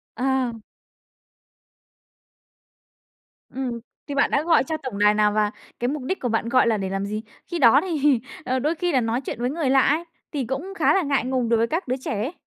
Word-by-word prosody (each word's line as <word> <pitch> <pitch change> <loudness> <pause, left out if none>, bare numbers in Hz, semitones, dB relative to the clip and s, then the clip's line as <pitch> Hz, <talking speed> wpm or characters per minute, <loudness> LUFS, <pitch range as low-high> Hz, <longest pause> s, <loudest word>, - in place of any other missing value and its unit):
À! 260 0 0 3.0
Ừm, 250 -2 -4 0.3
thì 285 - -4
bạn 280 - +2
đã 285 - +2
gọi 330 -5 +4
cho 315 +3 -3
tổng 260 -9 -6
đài 210 0 +5
nào 210 0 +3
và 210 -1 +1 0.3
cái 245 - 0
mục 285 -1 -3
đích 375 +9 -2
của 245 - -2
bạn 225 +1 0
gọi 255 -1 +4
là 220 -2 +2
để 195 -1 -3
làm 195 +1 -2
gì? 215 +1 -3 0.3
Khi 345 - -2
đó 260 +1 +7
thì, 295 -8 +2 0.3
ờ, 255 0 0
đôi 305 +5 0
khi 350 +1 -1
là 260 -3 +3
nói 230 +3 -1
chuyện 245 - -6
với 245 +1 0
người 295 -2 -1
lạ 270 0 +5
ấy, 315 +4 +2 0.3
thì 280 -5 -2
cũng 285 - -4
khá - - +4
là 390 - +3
ngại 280 -6 0
ngùng 255 -2 0
đối 230 - +4
với 230 +1 +2
các 330 +2 -2
đứa 255 - 0
trẻ 255 - -5
ấy. 275 +10 -3
260 Hz, 220 wpm, -23 LUFS, 230-290 Hz, 3.0 s, đó